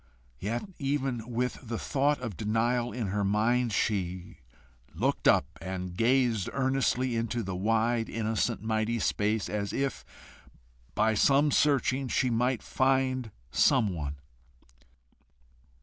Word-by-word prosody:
Yet, 115 Hz, -, -3 dB
even 135 Hz, -5 st, -2 dB
with 125 Hz, +1 st, -2 dB
the 115 Hz, -2 st, -5 dB
thought 145 Hz, +4 st, +1 dB
of 115 Hz, -6 st, -5 dB
denial 115 Hz, +5 st, 0 dB
in 115 Hz, -5 st, -3 dB
her 100 Hz, +1 st, -1 dB
mind, 115 Hz, +4 st, +2 dB
she 95 Hz, -4 st, -2 dB, 0.6 s
looked -, -, 0 dB
up, -, -, +5 dB, 0.2 s
and 90 Hz, -1 st, -5 dB
gazed 115 Hz, -2 st, +2 dB
earnestly 130 Hz, -2 st, +1 dB
into 115 Hz, +1 st, -1 dB
the 95 Hz, -1 st, -4 dB
wide 115 Hz, +4 st, +1 dB
innocent 110 Hz, 0 st, -1 dB
mighty 110 Hz, +1 st, 0 dB
space, 105 Hz, -1 st, 0 dB
as 100 Hz, -1 st, -3 dB
if 135 Hz, 0 st, -2 dB, 0.9 s
by 110 Hz, +1 st, +3 dB
searching 140 Hz, +1 st, +3 dB
she 125 Hz, 0 st, +1 dB
might 125 Hz, +1 st, 0 dB
find 130 Hz, -2 st, +1 dB, 0.2 s
some 125 Hz, -, +3 dB
one. 75 Hz, -4 st, -4 dB
115 Hz, 120 wpm, -29 LUFS, 105-130 Hz, 0.9 s, up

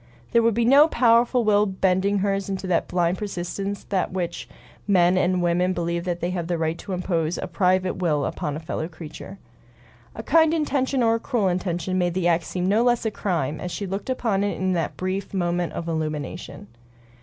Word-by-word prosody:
There 235 Hz, -, +4 dB
would 230 Hz, -2 st, +2 dB
be 235 Hz, 0 st, +2 dB
no 280 Hz, +5 st, +7 dB
powerful 240 Hz, -2 st, +3 dB
will 210 Hz, -1 st, +3 dB
bending 190 Hz, +1 st, +1 dB
hers 195 Hz, 0 st, -1 dB
in 195 Hz, -, -1 dB
that 185 Hz, -2 st, -1 dB
blind 175 Hz, 0 st, 0 dB
persistence 195 Hz, 0 st, -4 dB
with 190 Hz, -2 st, +1 dB
which 180 Hz, -2 st, -4 dB, 0.4 s
men 180 Hz, -2 st, +4 dB
and 180 Hz, 0 st, +1 dB
women 180 Hz, +2 st, +2 dB
believe 170 Hz, 0 st, -2 dB
they 175 Hz, 0 st, -2 dB
have 175 Hz, -2 st, -3 dB
a 175 Hz, -, 0 dB
right 160 Hz, 0 st, -1 dB
to 195 Hz, -, -6 dB
impose 175 Hz, -2 st, -1 dB
a -, -, -3 dB
private 185 Hz, -1 st, +1 dB
will 155 Hz, -6 st, 0 dB
upon 145 Hz, -, -3 dB
a -, -, -4 dB
fellow 160 Hz, 0 st, -4 dB
creature. 165 Hz, +3 st, -10 dB, 0.8 s
A 220 Hz, -, -6 dB
kind 320 Hz, +4 st, +4 dB
intention 275 Hz, -4 st, 0 dB
or 225 Hz, -1 st, +4 dB
a 230 Hz, -, 0 dB
cruel 225 Hz, -6 st, 0 dB
intention 180 Hz, 0 st, -1 dB
made 175 Hz, -1 st, 0 dB
the 185 Hz, -2 st, +1 dB
act 170 Hz, -1 st, +2 dB
seem 180 Hz, 0 st, -2 dB
no 210 Hz, +4 st, +3 dB
less 240 Hz, -1 st, +2 dB
a 220 Hz, -, 0 dB
crime 160 Hz, -9 st, -2 dB
as 180 Hz, -, -4 dB
she 200 Hz, -, -4 dB
looked 195 Hz, +5 st, -5 dB
upon 225 Hz, -6 st, 0 dB
it 205 Hz, -, -1 dB
in 185 Hz, 0 st, 0 dB
that 165 Hz, -3 st, -2 dB
brief 185 Hz, +2 st, -3 dB
moment 175 Hz, -1 st, -1 dB
of 170 Hz, -, -5 dB
illumination. 155 Hz, -7 st, -4 dB
185 Hz, 200 wpm, -24 LUFS, 175-205 Hz, 0.8 s, no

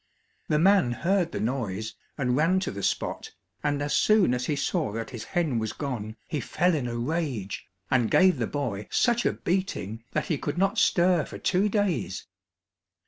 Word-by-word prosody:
The 150 Hz, -, +2 dB
man 185 Hz, -6 st, +4 dB
heard 175 Hz, +4 st, +1 dB
the -, -, -3 dB
noise, 110 Hz, -3 st, -2 dB, 0.2 s
and 125 Hz, -3 st, +1 dB
ran 165 Hz, +6 st, +3 dB
to 190 Hz, -, -2 dB
the 100 Hz, -, -6 dB
spot, -, -, -2 dB, 0.3 s
and 145 Hz, -1 st, 0 dB
as 145 Hz, -, -1 dB
soon 210 Hz, -, +4 dB
as 125 Hz, 0 st, -2 dB
he 150 Hz, -, +1 dB
saw 140 Hz, -6 st, -1 dB
that 115 Hz, +2 st, -4 dB
his 120 Hz, -4 st, -6 dB
hen 160 Hz, -10 st, 0 dB
was 110 Hz, 0 st, -3 dB
gone, 115 Hz, -7 st, -4 dB
he 155 Hz, -5 st, -2 dB
fell 180 Hz, +8 st, +1 dB
in 140 Hz, -6 st, -1 dB
a 120 Hz, 0 st, -3 dB
rage, 125 Hz, -, -3 dB, 0.2 s
and 125 Hz, -4 st, +3 dB
gave 185 Hz, -4 st, +5 dB
the 115 Hz, -, 0 dB
boy 105 Hz, -8 st, -3 dB
such 240 Hz, -1 st, +2 dB
a -, -, +1 dB
beating 140 Hz, -, -2 dB
that -, -, 0 dB
he 155 Hz, -5 st, -1 dB
could 145 Hz, -, -3 dB
not 195 Hz, +4 st, +2 dB
stir 175 Hz, -6 st, +4 dB
for -, -, -8 dB
two 195 Hz, +3 st, +1 dB
days. 195 Hz, -, -1 dB
145 Hz, 190 wpm, -27 LUFS, 120-180 Hz, 0.3 s, gave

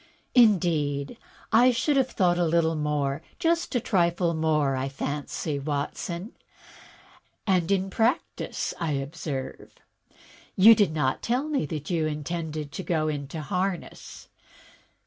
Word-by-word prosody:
"Indeed, 170 Hz, -, +3 dB, 0.4 s
I 245 Hz, +3 st, +6 dB
should 265 Hz, +4 st, +1 dB
have 265 Hz, -1 st, +2 dB
thought 175 Hz, -2 st, +1 dB
a 175 Hz, -, +3 dB
little 165 Hz, 0 st, +2 dB
more. 150 Hz, -3 st, -1 dB, 0.2 s
Just 335 Hz, -3 st, 0 dB
a -, -, +4 dB
trifle 170 Hz, -4 st, +1 dB
more, 155 Hz, -4 st, +1 dB
I 130 Hz, +1 st, -2 dB
fancy, 145 Hz, +2 st, -3 dB
Watson. 155 Hz, -, -4 dB, 1.1 s
And 185 Hz, -4 st, +2 dB
in 195 Hz, 0 st, +1 dB
practice 235 Hz, -, -1 dB
again, 170 Hz, -, -1 dB
I -, -, 0 dB
observe. 140 Hz, -1 st, -5 dB, 0.8 s
You 215 Hz, +4 st, +9 dB
did 205 Hz, -6 st, +2 dB
not 145 Hz, -4 st, 0 dB
tell 250 Hz, +5 st, 0 dB
me 290 Hz, -, -1 dB
that 150 Hz, +2 st, -5 dB
you 160 Hz, -3 st, +1 dB
intended 155 Hz, 0 st, -4 dB
to 190 Hz, -, -5 dB
go 160 Hz, -4 st, 0 dB
into 145 Hz, +1 st, -4 dB
harness. 180 Hz, +2 st, -4 dB
165 Hz, 130 wpm, -26 LUFS, 150-195 Hz, 1.1 s, You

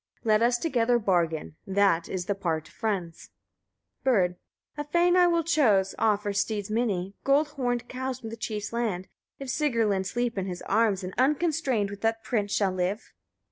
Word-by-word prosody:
Let 215 Hz, -2 st, +3 dB
us 240 Hz, +1 st, +3 dB
together 245 Hz, -4 st, +2 dB
bargain; 170 Hz, -7 st, 0 dB
that 195 Hz, -4 st, +2 dB
is 180 Hz, -2 st, -3 dB
the 205 Hz, -, 0 dB
part 165 Hz, -5 st, -2 dB
of -, -, -19 dB
friends. 190 Hz, -7 st, -3 dB, 0.7 s
Bird. 190 Hz, -9 st, +2 dB, 0.4 s
4. 295 Hz, 0 st, -4 dB
A -, -, -30 dB
fane 345 Hz, +3 st, +3 dB
I 360 Hz, -1 st, +6 dB
will 335 Hz, -1 st, +2 dB
chose, 225 Hz, -, +3 dB
offer 210 Hz, -2 st, +1 dB
steads 205 Hz, 0 st, -1 dB
many, 200 Hz, -5 st, -1 dB
gold 285 Hz, +2 st, +3 dB
horned 245 Hz, -5 st, -2 dB
cows 260 Hz, 0 st, -4 dB
from 225 Hz, -3 st, -7 dB
the -, -, -5 dB
chief's 215 Hz, -1 st, -4 dB
land, 215 Hz, -6 st, -2 dB, 0.3 s
if 275 Hz, -, -7 dB
Sigrlinn 230 Hz, -10 st, +1 dB
sleep 240 Hz, 0 st, -1 dB
in 190 Hz, -, -3 dB
his 180 Hz, -1 st, -6 dB
arms, 205 Hz, -3 st, +1 dB
and 185 Hz, 0 st, -5 dB
unconstrained 275 Hz, -7 st, +1 dB
with 200 Hz, 0 st, -9 dB
that 225 Hz, 0 st, 0 dB
prince 215 Hz, -2 st, -1 dB
shall 200 Hz, -2 st, +2 dB
live. 185 Hz, +4 st, -3 dB
220 Hz, 180 wpm, -27 LUFS, 195-255 Hz, 0.7 s, I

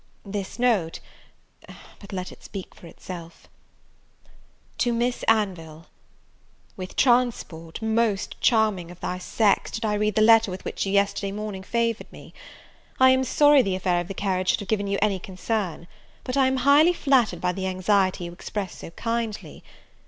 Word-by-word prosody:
This 200 Hz, 0 st, -5 dB
note, 220 Hz, -10 st, +1 dB, 1.0 s
but 200 Hz, -, -12 dB
let 185 Hz, -2 st, -5 dB
it -, -, -15 dB
speak 195 Hz, -3 st, -8 dB
for 170 Hz, -, -14 dB
itself. 170 Hz, -1 st, -10 dB, 1.3 s
"To 240 Hz, -, +2 dB
Miss 240 Hz, +1 st, -1 dB
Anville. 175 Hz, -8 st, 0 dB, 0.9 s
"With 185 Hz, -3 st, -8 dB
transport, 235 Hz, -9 st, 0 dB
most 220 Hz, -2 st, 0 dB
charming 215 Hz, -7 st, +2 dB
of 175 Hz, 0 st, -12 dB
thy 180 Hz, -, -4 dB
sex, 200 Hz, +2 st, +1 dB
did 225 Hz, 0 st, -4 dB
I 210 Hz, -, 0 dB
read 210 Hz, 0 st, 0 dB
the 215 Hz, -, +4 dB
letter 225 Hz, -1 st, +6 dB
with 185 Hz, 0 st, -7 dB
which -, -, -3 dB
you -, -, -1 dB
yesterday 200 Hz, 0 st, +1 dB
morning 210 Hz, -1 st, -5 dB
favoured 230 Hz, +3 st, -2 dB
me. -, -, -13 dB, 0.7 s
I 260 Hz, 0 st, +7 dB
am 260 Hz, 0 st, +3 dB
sorry 290 Hz, +2 st, +5 dB
the 195 Hz, -6 st, -1 dB
affair 180 Hz, -2 st, 0 dB
of 175 Hz, -, -8 dB
the 195 Hz, -, -6 dB
carriage 185 Hz, -2 st, -1 dB
should -, -, +2 dB
have 200 Hz, -, -9 dB
given 205 Hz, -2 st, 0 dB
you 200 Hz, 0 st, 0 dB
any 200 Hz, -3 st, +1 dB
concern, 185 Hz, -2 st, -4 dB, 0.4 s
but 255 Hz, -, -4 dB
I 270 Hz, -1 st, +4 dB
am 265 Hz, 0 st, 0 dB
highly 300 Hz, +5 st, +6 dB
flattered 260 Hz, -, +2 dB
by 180 Hz, +1 st, 0 dB
the 190 Hz, +1 st, -4 dB
anxiety 185 Hz, 0 st, +1 dB
you 170 Hz, -, -6 dB
express 195 Hz, +2 st, -6 dB
so -, -, -8 dB
kindly. 230 Hz, +3 st, -4 dB
200 Hz, 165 wpm, -24 LUFS, 185-230 Hz, 1.3 s, I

